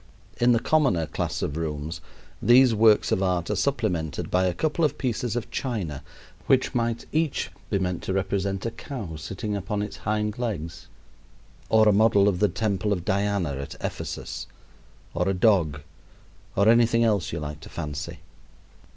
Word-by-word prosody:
In 120 +1 +4
the 120 - +5
commoner 130 - +2
class - - -3
of 70 - -2
rooms 80 0 -4 0.4
these 125 0 +6
works 110 -1 +4
of 95 - +2
art 90 -2 0
are - - 0
supplemented 100 - -1
by 90 +1 +3
a 90 - 0
couple 160 - 0
of 150 - +1
pieces 120 -2 -2
of 120 - -4
china 100 - -3 0.5
which 130 0 +3
might 115 -2 -1
each 155 -2 0 0.2
be 100 - +1
meant 90 -2 -2
to 95 - -3
represent 95 0 -1
a 115 - -1
cow 110 - -7
sitting 95 +7 -4
upon 100 +1 -2
its 105 - -6
hind 105 +1 -2
legs, 85 -8 -4 0.8
or 110 -1 +5
a 105 - +6
model 105 -1 +4
of 95 -3 +1
the 105 - +3
temple 105 -2 -1
of 90 -3 -1
Diana 100 -4 0
at 70 0 -6
Ephesus, - - -5 0.7
or 90 +2 0
a 95 - +1
dog, 90 -7 +3 0.7
or 100 +2 +3
anything 115 0 +5
else 105 -5 +1
you - - -3
like 75 0 -6
to 80 - -12
fancy. 75 -3 -6
100 Hz, 170 wpm, -25 LUFS, 85-115 Hz, 0.8 s, these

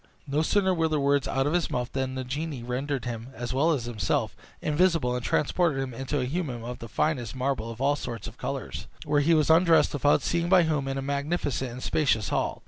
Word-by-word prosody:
No 145 +1 0
sooner 190 +3 +2
were 165 -2 +1
the 155 -1 0
words 140 0 +2
out 135 0 0
of 145 - 0
his 175 -2 +1
mouth 125 0 -2
than 130 -1 -2
the 130 - -3
genie 140 0 -4
rendered 130 +2 -2
him, 115 -1 -5
as 120 0 -4
well 150 +6 +3
as 135 -7 -1
himself, 110 -6 -1 0.2
invisible, 155 -5 +2
and 125 - -3
transported 155 +2 +1
him 135 -2 -3
into 135 +4 -2
a 125 - 0
hummum 130 -5 -3
of 125 +1 -6
the 115 - -7
finest 130 -3 -1
marble 130 -3 -1
of 115 0 -8
all 140 +2 +2
sorts 120 -5 -6
of 115 - -8
colors, 135 +1 -5 0.2
where 145 -1 +2
he 165 +3 +4
was 155 0 +3
undressed, 165 0 +5
without 145 0 +3
seeing 170 0 0
by 185 -2 +6
whom, 150 -4 0
in 135 0 -2
a 135 - -3
magnificent 140 -1 -1
and 125 +2 -8
spacious 120 -9 +1
hall. - - -1
140 Hz, 225 wpm, -27 LUFS, 125-155 Hz, 0.2 s, by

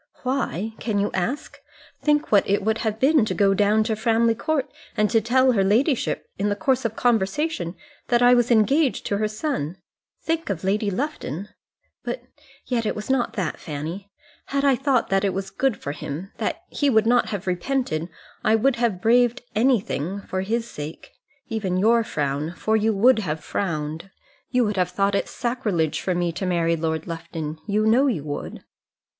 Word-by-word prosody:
"Why? 225 - -1
Can 220 -3 -1
you 200 +1 +1
ask? 235 +11 -3 0.4
Think 295 0 +1
what 205 -2 +4
it 200 0 +2
would 220 +2 +1
have 220 -1 -2
been 280 0 +4
to - - -2
go 195 -2 +4
down 210 +2 +3
to 220 0 -1
Framley 230 +1 +2
Court, 290 +4 -1 0.3
and 210 0 +2
to 225 -1 +4
tell 260 +3 +4
her 200 -5 +2
ladyship 235 - +1
in 205 +1 +1
the 205 - 0
course 260 +3 0
of 225 -1 -1
conversation 225 - 0 0.3
that 240 -1 +3
I 245 0 +7
was 240 -1 +3
engaged 255 +5 +3
to 200 - 0
her 215 +1 +1
son. 210 - -3 0.5
Think 325 -3 -1
of 190 -4 -3
Lady 205 +2 +1
Lufton. 200 - -4 0.5
But - - -4 0.4
yet 235 -3 -1
it - - -1
was 210 +4 -3
not 255 -3 +1
that, 185 -7 -3
Fanny. 165 +7 -6 0.4
Had 280 0 0
I 275 -2 +5
thought 265 -2 +1
that 195 0 +2
it 195 -2 0
was 190 0 -4
good 260 +4 0
for 140 - -5
him, 150 +6 -6
that - - -3
he 285 - +1
would 220 -3 +4
not 240 +1 +3
have 200 -3 -4
repented, 180 - -1 0.3
I 220 - +4
would 250 +3 +2
have 230 -7 0
braved 245 +2 +3
anything 200 - +1
for 185 -1 -3
his 230 +4 -1
sake. 150 -7 -8 0.4
Even 200 -5 -1
your 230 +4 +4
frown, 150 -1 -2
for 220 - +1
you 220 +1 +2
would 225 +4 +4
have 155 -6 -3
frowned. 160 -1 -3 0.4
You 250 -2 +2
would 210 -2 -2
have 180 -1 +2
thought 195 +2 +1
it 200 - 0
sacrilege 215 - -1
for 185 - -1
me 175 -1 0
to 185 +3 -4
marry 170 -2 +2
Lord 160 -1 -2
Lufton! 165 -2 -5
You 210 +1 +1
know 245 +6 +4
you 200 - -1
would." 145 -1 -6
215 Hz, 185 wpm, -23 LUFS, 185-245 Hz, 0.5 s, I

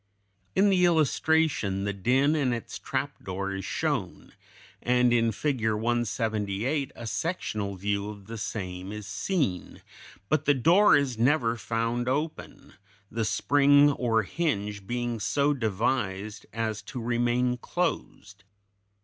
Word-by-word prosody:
In 200 +1 +4
the 180 -2 +3
illustration, 160 - +2
the 100 0 -1
den 130 +9 +2
and 130 -5 +1
its 115 - -7
trapdoor 100 -8 -3
is 95 -1 -5
shown, - - -3 0.5
and 125 0 +3
in 115 -1 +3
Figure 110 -3 0
178 115 +2 -1
a 115 - -8
sectional 110 - -3
view 100 +2 -2
of 100 -2 -10
the 115 +2 -7
same 95 -3 -5
is 105 -1 -7
seen; 100 - -2 0.4
but 155 +4 +1
the 145 - +4
door 175 - +5
is 135 -5 0
never 120 -2 +2
found 115 +1 -2
open, 150 +4 -4 0.4
the 115 0 -1
spring 145 +5 +4
or 115 -5 +1
hinge 105 - -2
being 120 -1 -2
so 140 +7 +1
devised 110 -3 -2
as 110 -2 -2
to 125 - -7
remain 120 +1 +1
closed. 100 - -4
120 Hz, 125 wpm, -27 LUFS, 105-140 Hz, 0.5 s, door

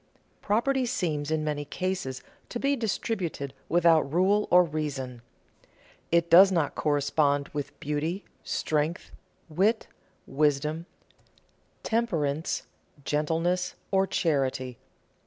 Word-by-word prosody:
Property 250 +5 +1
seems 160 - -1
in 160 -1 0
many 150 -1 -2
cases 150 -4 -3 0.3
to 240 - -4
be 280 +2 +2
distributed 195 - -3 0.2
without 165 -1 +5
rule 195 +5 +3
or 180 0 +7
reason. 140 -6 -4 0.9
It 170 0 +3
does 190 +3 +8
not 165 -6 +1
correspond 145 -1 +1
with 145 -1 -6
beauty, 155 +6 -2 0.2
strength, 155 +2 -1 0.4
wit, 195 +8 +1 0.4
wisdom, 150 +3 0 1.0
temperance, 165 -10 -1 0.4
gentleness, 165 +4 0 0.2
or 195 0 +3
charity. 130 -7 -1
160 Hz, 100 wpm, -27 LUFS, 145-185 Hz, 1.0 s, does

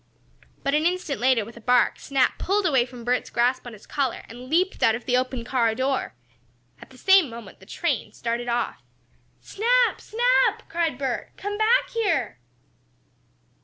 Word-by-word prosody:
But, 275 - 0
an 305 +2 +3
instant 355 -6 -2
later, 250 -4 +3
with 230 +2 -13
a - - -11
bark, 245 +1 +2
Snap 270 -2 0
pulled 400 +1 0
away 265 -7 +3
from 245 -1 -11
Bert's 250 +1 -1
grasp 245 +1 0
on 240 - -8
his 215 - -14
collar, 270 -4 -2
and 245 +2 -11
leaped 365 +5 +1
out 225 - +4
of 240 - -8
the 250 - +1
open 255 -1 -1
car 235 -3 +1
door. 265 +2 -1 0.7
At - - -13
the - - -17
same 380 -6 +5
moment 230 0 -11
the - - -17
train - - -2
started 235 +1 -3
off. 240 0 -2 0.6
"Snap! 485 +3 +1
Snap!" - - +1
cried 330 -5 -1
Bert. 265 -3 -3
"Come 410 +1 -4
back 440 +4 +2
here!" 400 - -1
260 Hz, 170 wpm, -24 LUFS, 240-365 Hz, 0.7 s, same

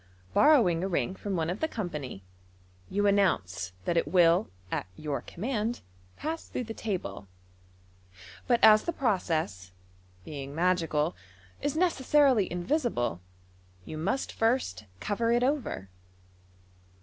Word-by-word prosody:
Borrowing 210 - +5
a - - 0
ring 185 0 0
from 200 0 -4
one 165 0 0
of 185 - -4
the 315 - +1
company, 150 - -5 0.7
you 205 +1 0
announce 95 - +1
that 170 - +1
it - - +2
will 175 +1 +4 0.2
at - - -2
your 150 -2 -3
command 225 +3 -3 0.4
pass 320 +2 -4
through - - -3
the 225 -1 -6
table; 175 - -4 1.2
but 240 -2 +4
as 215 0 +8
the 340 - -1
process, 160 - -1 0.5
being 140 -2 -7
magical, 165 -2 +1 0.5
is 290 +1 -1
necessarily 280 - +3
invisible, 175 - -1 0.6
you - - -7
must 190 +12 -1
first 225 - 0
cover 230 - 0
it 240 +1 +3
over. 255 - -1
190 Hz, 125 wpm, -29 LUFS, 155-240 Hz, 1.2 s, as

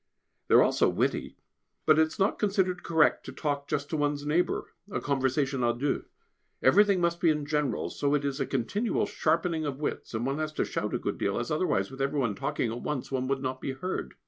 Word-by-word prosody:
They - - +4
are - - +8
all - - +3
so - - +3
witty, - - -1 0.5
but 155 0 +5
it 160 - +5
is 160 - -11
not 195 +1 +1
considered 190 -4 +1
correct 160 -2 +3
to - - -5
talk 145 -2 -2
just 145 0 -2
to 160 - 0
one's 145 -1 0
neighbour, 160 +4 0 0.2
a - - -2
conversation 135 -1 0
à 120 0 +1
deux. 140 +3 -1 0.6
Everything 200 +7 +5
must 170 0 +1
be 165 - +5
general, 145 -5 -1
so 145 0 +1
it 145 -1 -1
is 140 0 -2
a 135 - -1
continual 185 - 0
sharpening 165 -1 0
of 140 -2 -3
wits, 150 - -4
and 115 +2 -1
one 135 +3 -1
has 155 0 -2
to - - 0
shout - - -2
a - - +2
good - - -3
deal, 100 0 0
as 120 - -3
otherwise, 105 - 0
with 135 0 -7
every 140 +2 0
one 120 -6 +1
talking 135 0 -2
at 120 +1 -5
once, 145 -3 -3
one 130 -1 -1
would 135 0 -1
not 130 0 -3
be 135 - -3
heard. 180 +8 -4
145 Hz, 225 wpm, -28 LUFS, 130-160 Hz, 0.6 s, are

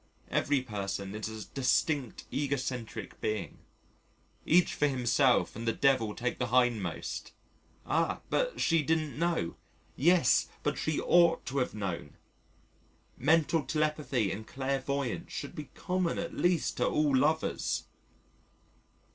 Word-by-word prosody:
Every 140 -3 +1
person 100 -3 -4
is 110 +1 -4
a 110 -1 -7
distinct 135 0 0
egocentric 135 -4 -3
being. 110 -1 -3 0.9
Each 175 +3 +4
for 150 - +2
himself 130 0 +2
and 115 +2 -5
the 115 - +2
Devil 125 -5 +2
take 125 +1 -2
the 125 - 0
hindmost. 120 -8 0 0.5
"Ah! 165 +4 0
but - - 0
she 165 -1 +3
didn't 155 -1 -1
know." 170 - 0 0.4
"Yes, 170 -1 +4 0.2
but - - -1
she 155 -1 0
ought 170 -1 +4
to 135 +1 -1
have 125 - -1
known." 100 -5 -4 1.0
Mental 160 +3 +3
telepathy 150 -8 0
and 110 +3 -6
clairvoyance 135 -1 -2
should - - -5
be 150 - -7
common 180 -2 -1
at 170 - -4
least 175 -2 +1
to - - +2
all 150 -2 +2
lovers. 155 +4 +1
135 Hz, 125 wpm, -30 LUFS, 115-155 Hz, 1.0 s, Each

